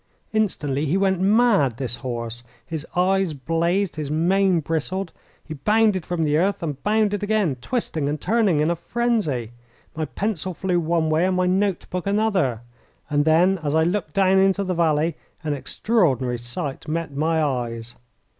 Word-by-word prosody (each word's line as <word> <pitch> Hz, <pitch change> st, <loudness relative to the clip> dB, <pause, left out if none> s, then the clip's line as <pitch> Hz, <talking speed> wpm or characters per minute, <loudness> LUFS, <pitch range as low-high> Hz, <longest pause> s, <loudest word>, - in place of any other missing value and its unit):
Instantly 155 Hz, -9 st, 0 dB
he 170 Hz, +7 st, +1 dB
went 190 Hz, -2 st, +1 dB
mad 200 Hz, -, +3 dB
this 120 Hz, -2 st, -3 dB
horse. 120 Hz, -2 st, -5 dB, 0.2 s
His 160 Hz, +2 st, -6 dB
eyes 185 Hz, -2 st, +2 dB
blazed. 170 Hz, +7 st, 0 dB
His 150 Hz, -2 st, -3 dB
mane 180 Hz, +4 st, +2 dB
bristled. 165 Hz, +4 st, -2 dB, 0.3 s
He 160 Hz, -, -6 dB
bounded 210 Hz, +4 st, +2 dB
from 175 Hz, -2 st, -1 dB
the 150 Hz, -1 st, +2 dB
earth 190 Hz, +2 st, 0 dB
and 145 Hz, -4 st, -4 dB
bounded 210 Hz, -1 st, +1 dB
again, 205 Hz, -9 st, +1 dB
twisting 160 Hz, -, -2 dB
and 150 Hz, +1 st, -2 dB
turning 205 Hz, -7 st, +2 dB
in 155 Hz, +3 st, +2 dB
a -, -, 0 dB
frenzy. 170 Hz, -, -1 dB, 0.4 s
My 155 Hz, 0 st, -2 dB
pencil 190 Hz, -1 st, -3 dB
flew 180 Hz, -1 st, 0 dB
one 165 Hz, -1 st, 0 dB
way 160 Hz, +4 st, +3 dB
and 185 Hz, -, 0 dB
my 185 Hz, -, +2 dB
note 190 Hz, 0 st, +1 dB
book 180 Hz, +1 st, -3 dB
another. 200 Hz, -, +1 dB, 0.5 s
And 145 Hz, 0 st, +2 dB
then, 175 Hz, +4 st, +4 dB
as 150 Hz, 0 st, -1 dB
I 160 Hz, -, +4 dB
looked 175 Hz, -2 st, -2 dB
down 190 Hz, 0 st, +4 dB
into 195 Hz, +1 st, +3 dB
the 185 Hz, -1 st, -1 dB
valley, 160 Hz, -1 st, +1 dB, 0.3 s
an 150 Hz, -2 st, -1 dB
extraordinary 135 Hz, -, 0 dB
sight 120 Hz, +5 st, -5 dB
met 160 Hz, -2 st, -3 dB
my 160 Hz, +3 st, +1 dB
eyes. 120 Hz, -4 st, -3 dB
170 Hz, 165 wpm, -23 LUFS, 150-195 Hz, 0.5 s, then